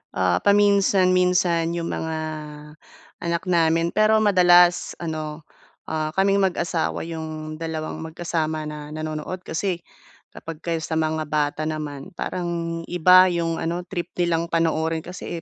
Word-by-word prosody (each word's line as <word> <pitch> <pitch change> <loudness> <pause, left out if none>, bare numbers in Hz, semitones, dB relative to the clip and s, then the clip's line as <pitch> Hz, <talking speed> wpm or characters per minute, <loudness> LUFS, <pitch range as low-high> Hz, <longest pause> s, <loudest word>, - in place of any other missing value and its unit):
Ah, 90 -1 +2
paminsan-minsan 185 -4 +3
'yong 170 0 -3
mga, 160 0 -3 1.0
anak 170 0 -2
namin 165 -1 +3
pero 215 +1 +3
madalas 180 -3 +5
ano, 155 -1 -5 0.5
ah, 155 -1 -2
kaming 195 +1 +3
mag-asawa 170 -2 -2
'yong 155 -1 -6
dalawang 160 -1 -4
magkasama 160 -1 -3
na 150 -1 -7
nanonood. 155 +4 -5
Kasi 180 +3 -2 0.6
kapagka 165 +1 -7
yung 160 - -3
sa 160 - -3
mga 155 0 0
bata 150 0 -1
naman 155 +2 -5
parang 170 -2 -3
iba 180 +2 +6
'yong 165 -1 -1
ano 170 +2 -2
trip 175 -1 -5
nilang 170 -1 0
panoorin 160 -1 0
kasi, 175 -1 -7
165 Hz, 125 wpm, -23 LUFS, 155-180 Hz, 1.0 s, iba